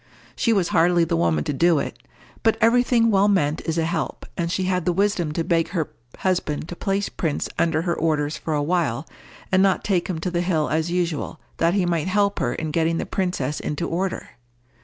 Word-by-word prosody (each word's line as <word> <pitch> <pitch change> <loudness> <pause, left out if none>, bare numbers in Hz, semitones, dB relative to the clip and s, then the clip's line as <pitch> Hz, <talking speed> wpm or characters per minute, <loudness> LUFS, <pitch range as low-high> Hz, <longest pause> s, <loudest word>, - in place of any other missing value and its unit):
She 230 - +1
was 195 -6 +2
hardly 175 0 +4
the 165 - 0
woman 80 -2 +1
to - - -2
do 165 +3 +3
it, 140 - -3 0.4
but 225 -1 +2
every 230 +2 +5
thing 230 -2 +3
well 200 0 +4
meant 155 -6 +1
is 160 0 -1
a 165 - +1
help, 165 -1 -3
and 170 -1 -2
she 185 +1 0
had 180 -2 0
the 180 - +3
wisdom 190 -3 +1
to 165 - -1
beg 165 -1 +1
her 165 -4 -2 0.3
husband 175 -5 -1
to 175 - -5
place 195 +2 -1
Prince 160 -4 -2
under 165 -1 +2
her 170 -1 0
orders 155 -2 0
for 155 - -3
a 145 - 0
while, 160 -5 0 0.5
and 190 0 +4
not 190 -1 +2
take 185 -4 0
him 180 - -2
to 180 - -2
the 175 0 0
hill 160 -6 0
as 160 +3 0
usual, 175 -3 -2 0.2
that 170 +2 +2
he 190 -3 +2
might 170 -1 0
help 200 +1 +1
her 120 - 0
in 155 -1 -3
getting 165 +1 +1
the - - -2
princess 180 -7 -2
into 150 +3 -3
order. 185 +3 -2
170 Hz, 220 wpm, -23 LUFS, 160-190 Hz, 0.5 s, every